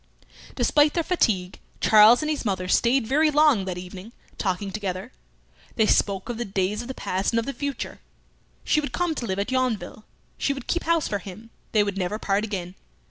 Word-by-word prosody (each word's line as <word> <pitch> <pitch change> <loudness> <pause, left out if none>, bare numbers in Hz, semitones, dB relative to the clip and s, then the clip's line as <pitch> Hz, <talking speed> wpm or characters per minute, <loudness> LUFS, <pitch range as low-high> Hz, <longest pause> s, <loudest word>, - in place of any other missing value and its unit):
Despite 295 0 +3
their 335 - +1
fatigue, 195 - 0 0.2
Charles 220 +5 +6
and 305 - -1
his 300 - -2
mother 190 -4 -2
stayed 235 +6 +3
very 300 +6 +3
long 295 -9 +4
that 185 -2 -4
evening 185 +5 -9 0.3
talking 195 0 -2
together. 195 +2 -4 0.6
They 220 - +3
spoke 195 -2 +1
of 240 -2 -5
the - - 0
days 195 +1 -1
of 240 - -9
the 260 - -6
past 190 +5 -2
and 230 - +3
of 230 - -3
the 275 - -4
future. 280 -3 -5 0.6
She 305 - +2
would 285 -4 -6
come 350 +1 0
to 245 -6 -5
live 190 -1 -2
at 200 +5 -2
Yonville; 235 -6 -1 0.4
she 280 - +1
would 270 - -8
keep 345 - -2
house 335 -1 +2
for 205 - -2
him; 210 +4 -11 0.2
they 210 -2 +4
would 200 -1 -3
never 185 +3 -2
part 200 -1 0
again. 185 -5 -4
220 Hz, 200 wpm, -24 LUFS, 195-270 Hz, 0.6 s, Charles